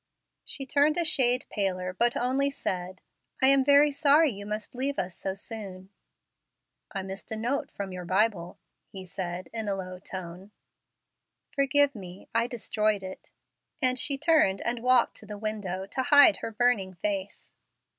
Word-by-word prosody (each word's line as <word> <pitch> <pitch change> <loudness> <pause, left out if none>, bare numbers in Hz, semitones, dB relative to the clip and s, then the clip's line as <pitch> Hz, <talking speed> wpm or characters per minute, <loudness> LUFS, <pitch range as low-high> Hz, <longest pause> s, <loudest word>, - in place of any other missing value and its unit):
She 270 - -3
turned 290 +4 +2
a 340 - +1
shade 250 -5 +2
paler, 185 -3 -2
but 240 +5 +1
only 265 +3 +1
said, 185 -8 -4 0.4
"I 265 - +5
am 275 -1 +5
very 285 +2 +5
sorry 290 +1 +4
you 200 -1 -9
must 210 0 -5
leave 270 +3 -2
us 180 -1 -2
so 190 0 -4
soon." 195 -3 -7 1.0
"I 195 - -4
missed 195 +4 -7
a - - -1
note 245 +6 -2
from 195 -1 -6
your 180 -1 -6
Bible," 185 -1 0 0.3
he 190 -1 -9
said, 180 -1 -5
in 225 -2 -3
a 200 - 0
low 185 -1 -7
tone. 185 +1 -8 1.0
"Forgive 280 +1 +3
me! 185 -4 -11
I 230 +1 +2
destroyed 215 -4 -1
it," 185 0 -9 0.5
and 255 0 +1
she 280 +1 +3
turned 295 - +3
and 235 0 -2
walked 250 -1 +3
to 210 - -7
the 210 0 -7
window 200 -3 -4
to 230 +6 -3
hide 285 +4 +6
her - - -5
burning 220 -5 0
face. 195 +2 -4
215 Hz, 165 wpm, -27 LUFS, 190-265 Hz, 1.0 s, hide